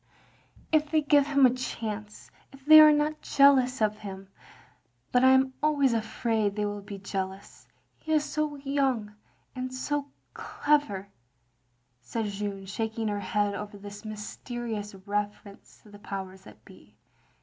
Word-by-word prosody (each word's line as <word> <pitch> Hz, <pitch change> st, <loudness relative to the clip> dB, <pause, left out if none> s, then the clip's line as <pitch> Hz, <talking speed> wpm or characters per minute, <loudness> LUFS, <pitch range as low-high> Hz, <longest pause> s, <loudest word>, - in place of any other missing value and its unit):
" -, -, -34 dB, 0.3 s
"If 310 Hz, -1 st, +2 dB
they 315 Hz, 0 st, +2 dB
give 290 Hz, -1 st, +4 dB
him 280 Hz, -2 st, +4 dB
a 250 Hz, -, +4 dB
chance, 215 Hz, -4 st, -6 dB, 0.2 s
if 275 Hz, -1 st, -17 dB
they 310 Hz, +1 st, +10 dB
are 305 Hz, 0 st, +9 dB
not 300 Hz, +1 st, 0 dB
jealous 265 Hz, -3 st, +4 dB
of 210 Hz, 0 st, 0 dB
him, 195 Hz, -2 st, -9 dB, 0.4 s
— 120 Hz, +1 st, -40 dB
^but 250 Hz, -, +4 dB
I 260 Hz, -, +7 dB
am 265 Hz, 0 st, +4 dB
always 285 Hz, -4 st, +2 dB
afmid 220 Hz, -2 st, -1 dB
they 210 Hz, -1 st, -1 dB
will 205 Hz, 0 st, -4 dB
be 200 Hz, 0 st, -8 dB
jealous 195 Hz, 0 st, -6 dB, 0.2 s
— -, -, -41 dB
^he 315 Hz, -, -1 dB
is 305 Hz, -1 st, +3 dB
so 300 Hz, 0 st, -2 dB
yotmg, 270 Hz, -6 st, -1 dB, 0.4 s
and 255 Hz, 0 st, -4 dB
so 285 Hz, +2 st, -3 dB, 0.3 s
clever, 230 Hz, -10 st, 0 dB, 0.5 s
" 120 Hz, 0 st, -45 dB
said 225 Hz, -2 st, -1 dB
Jeanne, 200 Hz, -1 st, -4 dB
shaking 220 Hz, +2 st, -3 dB
her 205 Hz, 0 st, -2 dB
head 205 Hz, +1 st, 0 dB
over 205 Hz, 0 st, -7 dB
this 205 Hz, +1 st, -10 dB
mysterious 215 Hz, 0 st, -6 dB
reference 205 Hz, 0 st, -5 dB
to 210 Hz, -, -17 dB
the 205 Hz, -, -13 dB
powers 190 Hz, -2 st, -7 dB
that -, -, -16 dB
be. -, -, -18 dB
220 Hz, 160 wpm, -28 LUFS, 205-275 Hz, 0.5 s, they